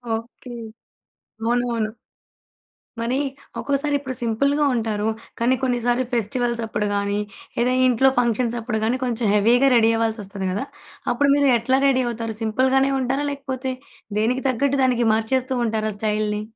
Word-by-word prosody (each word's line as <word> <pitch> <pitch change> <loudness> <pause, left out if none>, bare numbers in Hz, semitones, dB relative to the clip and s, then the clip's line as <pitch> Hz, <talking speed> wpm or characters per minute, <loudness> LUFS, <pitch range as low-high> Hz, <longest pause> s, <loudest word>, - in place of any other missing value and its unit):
Okay. 235 +2 -9 0.9
అవును. 240 +2 +2
అవును. 220 -2 -1 1.1
మరి 240 +3 0 0.4
ఒక్కోసారి 285 +1 0
ఇప్పుడు 265 -2 -5
సింపుల్‌గా 280 +6 +1
ఉంటారు. 220 -2 -1 0.3
కానీ 250 +3 +3
కొన్నిసార్లు 245 0 +1
ఫెస్టివల్స్ 235 +1 0
అప్పుడు 210 -1 -1
కాని 200 0 0 0.4
లేదా 245 +2 +2
ఇంట్లో 255 +2 +4
ఫంక్షన్స్‌ప్పుడు 235 -1 0
కానీ 245 +3 0
కొంచెం 240 -2 -1
హెవీగా 240 +6 +4
రెడీ 225 -1 +5
అవ్వాల్సొస్తది 210 -4 -2
కదా! 205 +8 -2 0.5
అప్పుడు 280 +4 +2
మీరు 285 -1 +3
ఎట్లా 260 +4 +2
రెడీ 260 -1 +3
అవుతారు? 230 -1 -3
సింపుల్‌గానే 260 +4 +2
ఉంటారా? 270 +3 -1
లేకపోతే 265 -2 -4 0.5
దేనికి 245 +4 0
తగ్గట్టు 275 +3 +1
దానికి 245 -2 +2
మార్చేస్తూ 255 +4 0
ఉంటారా 215 -1 -1
స్టైల్ని? 210 0 -1
240 Hz, 130 wpm, -22 LUFS, 220-260 Hz, 1.1 s, రెడీ